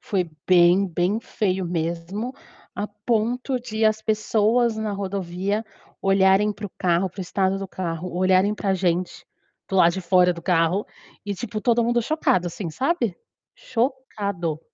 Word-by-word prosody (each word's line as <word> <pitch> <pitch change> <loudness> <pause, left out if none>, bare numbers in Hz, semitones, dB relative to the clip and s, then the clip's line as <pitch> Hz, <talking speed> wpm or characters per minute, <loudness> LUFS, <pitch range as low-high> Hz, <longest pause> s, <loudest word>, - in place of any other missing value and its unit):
foi 180 -5 -2 0.2
bem, 180 +2 +5
bem 180 +4 0
feio 190 -4 -1
mesmo, 170 +7 -3 0.4
a 205 - -2
ponto 235 +5 -1
de 220 -2 -2
as 215 0 +3
pessoas 220 +2 +2
na 215 -1 -2
rodovia 195 +1 -2 0.4
olharem 195 +2 +4
para 205 +1 -9
o - - -13
carro, 180 +1 +1
para 185 - -23
o - - -2
estado 190 +1 0
do 195 - -5
carro, 180 -1 -5
olharem 185 +2 +3
para 200 -2 -1
gente, 180 -1 -1 0.4
para 195 - -5
o - - +4
lado 170 -1 +6
de 190 - -3
fora 180 0 +4
do 170 - -9
carro, 175 +3 +1 0.4
e 205 - -2
tipo, 215 +1 -5
todo 235 0 +3
mundo 240 +1 +2
chocado, 230 - +1
assim, 175 0 -5
sabe, 245 - -1 0.4
chocado. 205 - -2
195 Hz, 160 wpm, -23 LUFS, 180-215 Hz, 0.4 s, lado